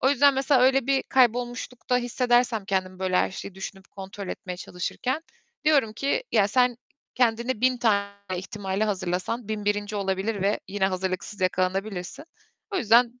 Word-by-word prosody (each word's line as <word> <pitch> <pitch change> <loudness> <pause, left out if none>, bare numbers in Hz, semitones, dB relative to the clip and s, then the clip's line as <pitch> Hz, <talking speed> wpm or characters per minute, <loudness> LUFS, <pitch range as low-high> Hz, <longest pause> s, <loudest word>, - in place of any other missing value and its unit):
O 265 - +4
yüzden 285 0 +5
mesela 270 -1 +3
öyle 265 0 +4
bir 270 -1 +2
kaybolmuşlukta 245 0 +1
hissedersem 245 -2 +1
kendimi, 185 -1 -2
böyle 185 -1 0
her - - +2
şeyi 190 0 -8
düşünüp 190 0 -8
kontrol 195 0 -8
etmeye 180 -1 -5
çalışırken, 250 - -3 0.4
diyorum 280 -8 +3
ki, 280 - -1
"Ya, 205 -3 +4
sen 245 +1 +3 0.4
kendine 235 -1 +1
1000 255 0 +3
tane 200 -4 +1 0.2
ihtimale 195 +2 -2
hazırlasan 195 +3 -2
1001'inci 205 0 -1
olabilir 195 +1 -1
ve 200 +2 +1
yine 195 -1 +1
hazırlıksız 190 +1 -3
yakalanabilirsin. 185 +6 -1 0.5
O 395 - -2
yüzden 240 - +4
215 Hz, 145 wpm, -26 LUFS, 190-250 Hz, 0.5 s, yüzden